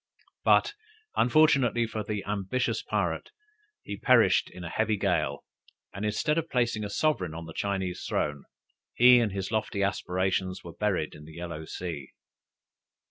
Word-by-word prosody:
But - - +4 0.4
unfortunately 125 -3 +4
for 110 -1 -4
the 105 -1 -4
ambitious 105 +4 -1
pirate, - - -2 0.5
he 100 - -6
perished - - +4
in 90 - -10
a 85 - -5
heavy 110 +3 0
gale, - - 0 0.5
and 100 - -6
instead 105 +9 +1
of 165 0 -5
placing 120 -4 0
a 105 - -4
sovereign 150 - 0
on 85 0 -6
the 80 - -9
Chinese 95 -2 -2
throne, 75 -1 -1 0.5
he 125 +1 +8
and 115 -3 +1
his 95 +1 -4
lofty 110 -2 -1
aspirations 95 -1 -1
were 85 - -9
buried 95 -6 -1
in 75 - -12
the 80 - -12
yellow 85 -2 -6
sea. 80 -6 -6
100 Hz, 150 wpm, -28 LUFS, 90-115 Hz, 0.5 s, he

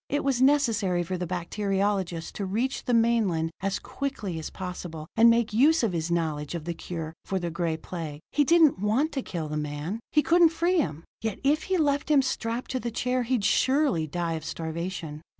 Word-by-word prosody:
It 290 - 0
was 270 -3 +1
necessary 230 -11 +3
for 185 +2 -3
the 180 -1 -3
bacteriologist 190 -1 -1
to 200 - -3
reach 235 +8 -1
the 245 - 0
mainland 215 -9 +2
as 195 0 0
quickly 220 -11 -4
as 155 - -5
possible, 175 -4 -6
and 230 +1 +7
make 230 -2 +2
use 290 +6 +4
of 215 -5 +1
his 165 0 -2
knowledge 160 -2 -1
of 160 -2 -5
the 170 - -2
cure 165 -2 -6
for 195 - -2
the 175 -2 -3
Gray 170 -1 -1
Plague. 160 -3 -6
He 295 - +3
didn't 315 - +5
want 225 - +1
to 275 - -2
kill 170 -9 -4
the 150 0 -3
man; 150 +7 -3
he 300 - +4
couldn't 340 0 +5
free 340 +2 +1
him; 160 - -2 0.2
yet 220 -2 -2
if 295 +3 +2
he 380 -1 +1
left 285 -2 +1
him 285 -3 +5
strapped 235 -1 -3
to 260 - -1
the 240 - -3
chair, 250 +2 0
he'd 240 -3 0
surely 260 - +2
die 170 +2 -2
of 160 -1 -4
starvation. 160 -1 -5
200 Hz, 205 wpm, -27 LUFS, 170-260 Hz, 0.2 s, and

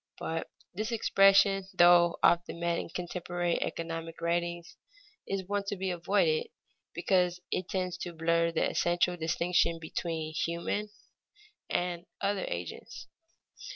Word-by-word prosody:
But 165 0 -4 0.2
this 215 +5 -3
expression, 195 -3 +4
though 175 0 +6
often 175 0 +3
met 170 0 0
in - - -6
contemporary 175 0 -2
economic 165 0 -4
writings, 170 0 -2 0.5
is 195 -2 -3
one 205 0 -1
to 205 - -1
be 190 -1 -2
avoided 205 - +1 0.5
because 180 -2 +1
it 185 - -2
tends 185 -1 -2
to 175 - -4
blur 170 +1 +1
the 165 - +1
essential 175 +1 +1
distinction 170 +1 +1
between 160 -1 -4
human 170 +6 -2 0.8
and 175 0 -2
other 200 -1 -1
agents. 85 0 -6
175 Hz, 120 wpm, -30 LUFS, 170-190 Hz, 0.8 s, though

